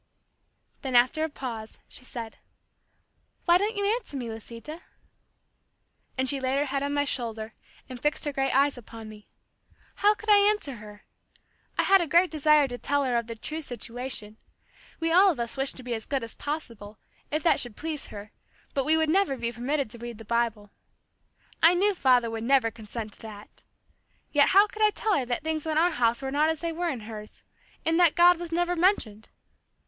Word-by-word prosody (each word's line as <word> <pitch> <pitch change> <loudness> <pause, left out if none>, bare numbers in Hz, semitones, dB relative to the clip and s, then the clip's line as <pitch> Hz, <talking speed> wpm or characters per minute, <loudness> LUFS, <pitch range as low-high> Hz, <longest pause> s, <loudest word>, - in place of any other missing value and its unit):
Then 265 -3 -3
after 255 +6 +4
a 320 - -1
pause, 230 -6 -7
she - - -7
said, 230 -3 -7 1.1
"Why 345 0 +5
don't 425 +3 -1
you 405 - 0
answer 430 - -1
me, 240 -3 -4
Lisita?" 230 +8 -9 1.4
And 260 0 +1
she 275 +1 +3
laid 265 +1 0
her 290 - +1
head 275 0 -2
on 285 0 -2
my 285 - +2
shoulder 225 -5 -4 0.3
and 255 -2 -9
fixed 295 +1 0
her 290 - -2
great 270 0 0
eyes 275 0 +2
upon 225 -1 -11
me. 210 -1 -13 0.7
How 415 +1 +4
could 435 +1 -8
I 410 - +8
answer 405 - +1
her! 210 -1 -12 0.7
I - - +3
had 390 -1 +5
a 340 - -1
great 340 +4 +4
desire 305 -2 +4
to 245 -1 -7
tell 285 0 0
her 250 -2 0
of 235 -1 0
the 230 - -6
true 310 +8 -5
situation. 245 -4 -5 0.6
We 330 0 0
all 380 +4 +6
of 315 -9 -2
us 235 -1 -3
wished 270 0 -1
to 255 - -8
be 245 -1 -3
as 220 -1 -5
good 275 -4 -1
as 230 - -7
possible, 230 -9 -6 0.3
if 305 +1 -2
that 340 - +4
should 240 -4 -2
please 310 -2 -3
her, 205 0 -10 0.4
but 275 -2 0
we 315 +1 +4
would 320 0 +2
never 345 -4 +2
be 235 -1 -2
permitted 250 +1 -2
to 235 - -10
read 240 -1 -7
the 225 - -11
Bible. 225 -2 -1 0.9
I 335 +2 +6
knew 405 +3 +3
father 250 -8 +3
would 225 0 -4
never 250 -2 +3
consent 220 -1 -7
to - - -18
that. 210 -2 -11 0.7
Yet 290 -1 +4
how 400 +2 +7
could 430 +1 -9
I 425 - +6
tell 420 0 0
her 265 - 0
that 245 +4 -2
things 315 0 -2
in 310 -1 0
our 345 +3 +4
house 240 -2 +1
were 265 - -3
not 300 +3 +2
as 320 -1 -2
they 335 -1 -2
were 345 +1 -2
in 255 -7 -4
hers 215 -1 -10 0.4
in 325 0 +2
that 345 -3 +5
God 350 0 +6
was 345 -1 -6
never 350 +1 0
mentioned! 325 - +1
270 Hz, 205 wpm, -27 LUFS, 230-325 Hz, 1.4 s, I